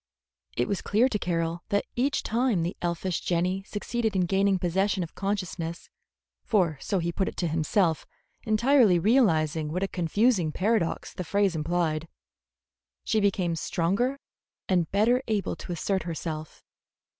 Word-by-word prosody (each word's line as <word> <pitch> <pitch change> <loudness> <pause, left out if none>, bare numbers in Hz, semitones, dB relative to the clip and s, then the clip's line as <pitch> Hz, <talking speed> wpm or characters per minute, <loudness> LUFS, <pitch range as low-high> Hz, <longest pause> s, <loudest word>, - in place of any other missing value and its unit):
It 120 - +1
was 200 - -2
clear 220 +5 +3
to 215 -5 -2
Carroll 170 -1 -1
that 200 0 +1
each 270 +4 0
time 230 -6 +1
the 175 - -3
elfish 175 +1 -2
Jenny 180 +2 0
succeeded 220 0 -2
in 185 -1 +2
gaining 195 +2 +2
possession 185 +2 0
of 165 - -8
consciousness, 185 -4 -4 0.5
for 175 - +1
so 195 - -1
he 170 -1 -1
put 190 +3 -1
it - - -5
to 175 - 0
himself, 160 +2 +1 0.4
entirely 225 -2 +4
realizing 160 - +2
what 180 +4 -1
a - - +1
confusing 185 0 +1
paradox 200 0 0
the 180 - -4
phrase 200 +1 +1
implied, 160 0 -1 1.0
she 220 - +1
became 185 -4 +1
stronger 195 +12 0 0.5
and 175 -3 +1
better 230 +6 +3
able 210 -4 -1
to - - -8
assert 190 +3 -1
herself. 155 -2 -6
185 Hz, 145 wpm, -27 LUFS, 170-210 Hz, 1.0 s, entirely